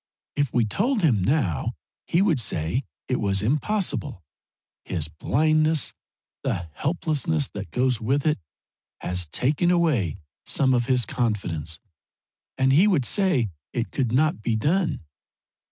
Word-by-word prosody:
If 145 -4 0
we 120 -2 +2
told 210 - 0
him 120 - +3
now 120 - 0 0.3
he 175 +3 +3
would 165 -9 +2
say 110 - -1 0.2
it 125 - 0
was 100 -2 +1
impossible. 150 - 0 0.6
His 80 -4 -2
blindness, 155 - +2 0.5
the 85 -2 -3
helplessness 155 - 0
that 100 -4 -7
goes 125 +4 +1
with 135 +5 0
it, 150 -5 +2 0.6
has 90 -2 -1
taken 145 - +1
away 155 - +2 0.3
some 130 -2 +2
of 120 -1 +1
his 125 -3 +2
confidence, 95 - -2 0.8
and 135 0 +3
he 175 +9 +6
would 165 -11 +2
say 140 - +1 0.2
it 120 -1 -2
could 125 -5 -1
not 155 0 +2
be 115 +1 0
done. 160 - 0
130 Hz, 135 wpm, -25 LUFS, 105-155 Hz, 0.8 s, he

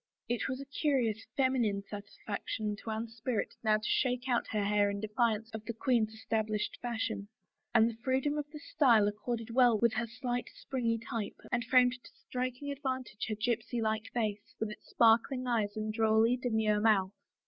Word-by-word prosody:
It 240 -1 -1
was 260 0 -3
a 275 - -6
curious 265 -7 0
feminine 245 -7 +2
satisfaction 205 +1 -4
to 225 - -8
Anne's 225 +1 -4
spirit 230 0 -2
now 215 -1 +4
to 215 - -11
shake 250 -1 +1
out 245 -2 +1
her 210 -2 -1
hair 205 0 +3
in 200 0 -3
defiance 220 +1 0
of 220 -1 -5
the 235 - -4
queen's 230 -2 +2
established 220 -1 -2
fashion; 225 -4 -2 0.5
and 225 -1 +7
the 230 -1 -4
freedom 265 +3 +1
of 295 0 -5
this 300 -1 -11
style 235 -9 +5
accorded 230 +2 -3
well 240 -2 +5
with 235 +1 +3
her 235 +1 -1
slight, 245 +1 -3
springing 230 -4 -1
type 230 -4 -4
and 240 -1 +1
framed 250 +1 +4
tO - - -13 0.2
striking 255 +3 -3
advantage 260 -6 -3
her 215 - -1
gypsy 235 +2 -1
like 220 -1 -1
face, 210 -3 -2
with 220 -1 -2
its - - -12
sparkling 235 +3 +4
eyes 220 -4 0
and 215 0 -2
drolly 220 +1 +4
demure 220 -4 +1
mouth. 205 -3 +3
230 Hz, 180 wpm, -32 LUFS, 215-250 Hz, 0.5 s, and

